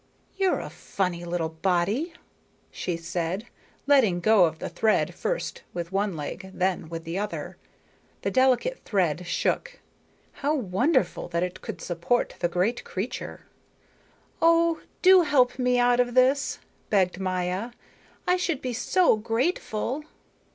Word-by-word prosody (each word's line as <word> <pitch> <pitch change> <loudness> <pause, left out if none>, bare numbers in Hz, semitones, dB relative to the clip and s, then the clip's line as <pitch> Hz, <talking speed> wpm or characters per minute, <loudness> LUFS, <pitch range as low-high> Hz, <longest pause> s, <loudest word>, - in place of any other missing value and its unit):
"You're 385 -2 +2
a - - -7
funny 180 -3 -3
little 170 -2 -1
body," 190 - 0 0.6
she 175 -2 -3
said, 170 +4 -3 0.4
letting 255 -11 +4
go 200 0 +5
of 160 -1 -2
the - - -5
thread 220 -1 +1
first - - -3
with 170 0 -4
one 195 -2 0
leg, 185 +6 -6
then 180 -3 -1
with 165 -1 -6
the 170 +3 -3
other. 210 0 -4 0.7
The - - 0
delicate 265 - +2
thread 180 -5 0
shook. - - -1 0.5
How 290 +2 -1
wonderful 245 - +1
that 170 0 -1
it 180 +1 -4
could - - -7
support 175 +8 0
the - - +2
great 220 +8 0
creature. 195 +6 -5 1.0
"Oh, 335 0 +4 0.2
do 375 0 +8
help 265 -6 +3
me 250 0 +2
out 245 0 +4
of 245 0 +1
this," 265 +2 +3 0.3
begged 185 -3 +2
Maya, 185 +3 -1 0.6
"I 360 0 +3
should 345 -6 -1
be 250 -1 -2
so 345 +3 +3
grateful." 235 +3 -1
215 Hz, 135 wpm, -26 LUFS, 180-265 Hz, 1.0 s, do